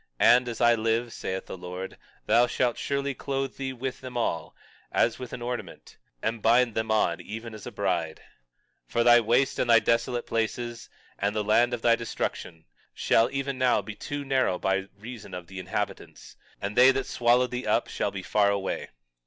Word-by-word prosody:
And 125 Hz, +1 st, +6 dB
as 115 Hz, -, -5 dB
I 120 Hz, 0 st, +6 dB
live, 115 Hz, +1 st, 0 dB
saith 95 Hz, 0 st, -4 dB
the -, -, -7 dB
Lord, 90 Hz, +1 st, -7 dB, 0.3 s
thou 120 Hz, +1 st, +4 dB
shalt 120 Hz, 0 st, 0 dB
surely 140 Hz, 0 st, -1 dB
clothe 135 Hz, 0 st, -3 dB
thee 135 Hz, -1 st, -3 dB
with 130 Hz, +1 st, -5 dB
them 130 Hz, -2 st, -6 dB
all, 85 Hz, -9 st, -2 dB, 0.4 s
as 115 Hz, -, +2 dB
with 125 Hz, -1 st, -7 dB
an 120 Hz, -, -6 dB
ornament, 120 Hz, 0 st, -6 dB, 0.2 s
and 115 Hz, 0 st, -1 dB
bind 120 Hz, +1 st, +4 dB
them 110 Hz, 0 st, -2 dB
on 90 Hz, -5 st, +1 dB
even 110 Hz, +5 st, -7 dB
as 110 Hz, -, -9 dB
a -, -, -6 dB
bride. 85 Hz, -5 st, -1 dB, 0.7 s
21:19 -, -, -25 dB
For 120 Hz, -, +3 dB
thy 120 Hz, 0 st, +7 dB
waste 120 Hz, +4 st, +2 dB
and 120 Hz, -, 0 dB
thy 115 Hz, -, +8 dB
desolate 115 Hz, +2 st, +1 dB
places, 115 Hz, +1 st, -3 dB, 0.3 s
and 100 Hz, +1 st, 0 dB
the 105 Hz, -, 0 dB
land 115 Hz, +4 st, +3 dB
of 115 Hz, -, -11 dB
thy 115 Hz, -1 st, +5 dB
destruction, 85 Hz, -7 st, -4 dB, 0.3 s
shall 115 Hz, +1 st, +3 dB
even 135 Hz, -1 st, -3 dB
now 125 Hz, -5 st, +3 dB
be 105 Hz, +2 st, -7 dB
too 145 Hz, +5 st, -5 dB
narrow 130 Hz, -9 st, +1 dB
by 95 Hz, +1 st, 0 dB
reason 110 Hz, -3 st, -9 dB
of 90 Hz, -1 st, -7 dB
the 95 Hz, +2 st, -8 dB
inhabitants; 90 Hz, 0 st, -5 dB, 0.2 s
and 100 Hz, +1 st, -4 dB
they 125 Hz, +2 st, +8 dB
that 135 Hz, 0 st, +1 dB
swallowed 120 Hz, +1 st, +2 dB
thee 125 Hz, +1 st, -4 dB
up -, -, +2 dB
shall -, -, -2 dB
be -, -, -6 dB
far 105 Hz, -1 st, +3 dB
away. 100 Hz, -1 st, -2 dB
115 Hz, 195 wpm, -27 LUFS, 105-125 Hz, 0.7 s, thy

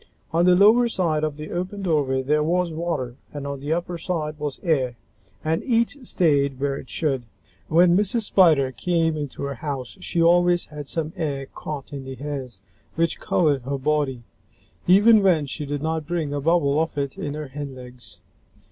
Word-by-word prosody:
On 170 Hz, +2 st, +3 dB
the 180 Hz, 0 st, +6 dB
lower 220 Hz, +6 st, +6 dB
side 165 Hz, -8 st, 0 dB
of 155 Hz, -2 st, -2 dB
the 155 Hz, 0 st, -7 dB
open 185 Hz, +3 st, -4 dB
doorway 140 Hz, -7 st, +1 dB
there 150 Hz, +3 st, +2 dB
was 175 Hz, +2 st, +1 dB
water 155 Hz, -7 st, -3 dB
and 145 Hz, -1 st, -6 dB
on 140 Hz, -1 st, -4 dB
the 145 Hz, +3 st, -4 dB
upper 175 Hz, +1 st, -2 dB
side 155 Hz, -4 st, -3 dB
was 145 Hz, -2 st, -4 dB
air, 135 Hz, -8 st, +1 dB, 0.5 s
and 160 Hz, +1 st, 0 dB
each 235 Hz, +1 st, +1 dB
stayed 140 Hz, -6 st, +2 dB
where 140 Hz, 0 st, 0 dB
it -, -, -9 dB
should. 140 Hz, -6 st, -1 dB, 0.5 s
When 175 Hz, +2 st, +5 dB
Mrs. 210 Hz, +4 st, +2 dB
Spider 160 Hz, -10 st, +4 dB
came 165 Hz, +3 st, 0 dB
into 145 Hz, -3 st, -5 dB
her 140 Hz, 0 st, -2 dB
house, 135 Hz, -2 st, -5 dB
she 170 Hz, -, -2 dB
always 175 Hz, +1 st, +4 dB
had 150 Hz, -2 st, -9 dB
some 160 Hz, +1 st, -3 dB
air 140 Hz, -4 st, -3 dB
caught 145 Hz, +1 st, -7 dB
in 140 Hz, -1 st, -5 dB
the 130 Hz, 0 st, -6 dB
hairs 130 Hz, -7 st, -6 dB, 0.3 s
which 165 Hz, 0 st, 0 dB
covered 150 Hz, -6 st, +1 dB
her 140 Hz, +3 st, -3 dB
body, 135 Hz, -3 st, -1 dB, 0.6 s
even 210 Hz, +4 st, +7 dB
when 175 Hz, -6 st, +3 dB
she 145 Hz, +2 st, -5 dB
did 145 Hz, 0 st, -3 dB
not 160 Hz, -1 st, -2 dB
bring 165 Hz, -4 st, -2 dB
a 145 Hz, -, -2 dB
bubble 155 Hz, -2 st, +2 dB
of 160 Hz, -2 st, -3 dB
it 140 Hz, -1 st, -2 dB
in 145 Hz, 0 st, -3 dB
her 150 Hz, -2 st, -6 dB
hindlegs. 125 Hz, -9 st, -8 dB
150 Hz, 185 wpm, -23 LUFS, 140-175 Hz, 0.6 s, even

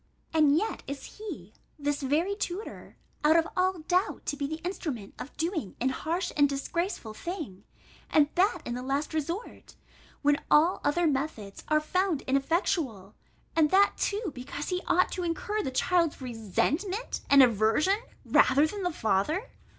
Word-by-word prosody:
And 305 Hz, -2 st, +5 dB
yet 435 Hz, +6 st, -1 dB
is 280 Hz, +8 st, -8 dB
he, 305 Hz, -, -7 dB, 0.2 s
this 290 Hz, 0 st, -1 dB
very 315 Hz, +9 st, +1 dB
tutor 400 Hz, 0 st, -6 dB, 0.3 s
out 305 Hz, +2 st, +5 dB
of 330 Hz, 0 st, +4 dB
all 370 Hz, -1 st, +1 dB
doubt, 360 Hz, +4 st, 0 dB
to -, -, -1 dB
be 285 Hz, -1 st, -2 dB
the 315 Hz, +2 st, -5 dB
instrument 295 Hz, -, -4 dB
of 280 Hz, -, -8 dB
doing 320 Hz, -, -2 dB
an 260 Hz, -, +1 dB
harsh 335 Hz, +7 st, -2 dB
and 290 Hz, -2 st, +4 dB
disgraceful 280 Hz, -, -3 dB
thing, 280 Hz, -, -6 dB, 0.4 s
and 295 Hz, -2 st, +5 dB
that 360 Hz, -2 st, +2 dB
in 240 Hz, -, -3 dB
the 250 Hz, -, -4 dB
last 275 Hz, +4 st, -2 dB
resort, 335 Hz, +8 st, -4 dB, 0.5 s
when 290 Hz, 0 st, +3 dB
all 325 Hz, +5 st, +4 dB
other 345 Hz, +4 st, +2 dB
methods 270 Hz, -9 st, -2 dB
are 305 Hz, 0 st, +3 dB
found 360 Hz, 0 st, 0 dB
ineffectual; 270 Hz, -, 0 dB, 0.4 s
and 315 Hz, -2 st, +4 dB
that 395 Hz, +3 st, +5 dB
too, 410 Hz, -3 st, -1 dB
because 280 Hz, +3 st, -6 dB
he 365 Hz, -1 st, -1 dB
ought 365 Hz, -, +3 dB
to 365 Hz, -, -3 dB
incur 420 Hz, +6 st, -1 dB
the 270 Hz, -, -2 dB
child's 335 Hz, +4 st, +1 dB
resentment 280 Hz, -, -2 dB
and 280 Hz, -1 st, +8 dB
aversion, 240 Hz, -, +3 dB, 0.3 s
rather 275 Hz, +3 st, +5 dB
than 400 Hz, +6 st, -4 dB
the 360 Hz, -1 st, 0 dB
father? 300 Hz, -, 0 dB
310 Hz, 160 wpm, -28 LUFS, 270-365 Hz, 0.5 s, and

